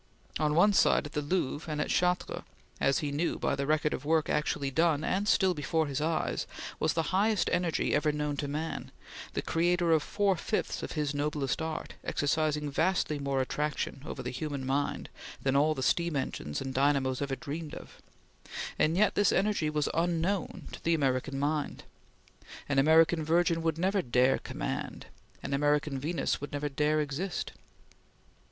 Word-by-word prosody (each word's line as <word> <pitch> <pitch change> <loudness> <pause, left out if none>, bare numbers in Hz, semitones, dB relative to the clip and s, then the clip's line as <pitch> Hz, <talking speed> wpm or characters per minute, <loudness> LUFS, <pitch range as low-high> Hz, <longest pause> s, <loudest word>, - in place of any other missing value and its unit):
On 150 -1 +1
one 205 +5 +5
side, 190 - +4
at 150 - -7
the 150 - 0
Louvre 150 0 -2
and 150 - -2
at - - -1
Chartres, 180 0 +1 0.4
as 135 - +3
he 145 - -2
knew 155 +4 0
by - - 0
the 140 0 -2
record 150 0 +2
of - - -4
work 155 +1 +2
actually 145 -2 0
done 160 0 +2
and 200 +5 0
still 190 -3 +4
before 160 +1 0
his 140 0 -3
eyes, 160 +1 -1 0.3
was - - +1
the 165 +2 -1
highest 205 +1 +2
energy 175 -2 +1
ever 150 +1 +2
known 150 -1 -2
to 145 - -2
man, 155 +3 -4 0.4
the - - -2
creator 175 +1 +2
of 160 -1 +4
four 200 +4 +1
fifths - - -2
of - - -5
his 150 -2 -1
noblest 145 -1 -1
art, 160 0 -4
exercising 150 0 0
vastly 160 -1 +1
more 140 -1 0
attraction 150 0 -2
over 140 -4 -6
the 125 - -3
human 140 0 -4
mind 140 +2 -1 0.4
than 135 0 +1
all 155 +2 +3
the 130 - -3
steam 170 +1 +1
engines 100 - -3
and 135 -1 -4
dynamos 135 -1 +2
ever 140 -1 -1
dreamed 155 +2 -6
of; - - -12 0.8
and 160 +3 +3
yet 205 0 +4
this 205 -2 +3
energy 195 -6 +1
was 150 -1 0
unknown 170 +3 -1
to - - -10
the 165 0 +3
American 135 -1 0
mind. 145 +1 -1 0.8
An 140 -1 +2
American 160 +3 +5
Virgin 165 +1 +2
would 165 -1 0
never 190 +3 +1
dare 125 0 +3
command; - - -5 0.4
an 140 - -3
American 145 0 +1
Venus 160 +2 -1
would 145 - -6
never 145 0 -2
dare 150 +2 +1
exist. 150 +6 -3
150 Hz, 175 wpm, -30 LUFS, 140-165 Hz, 0.8 s, one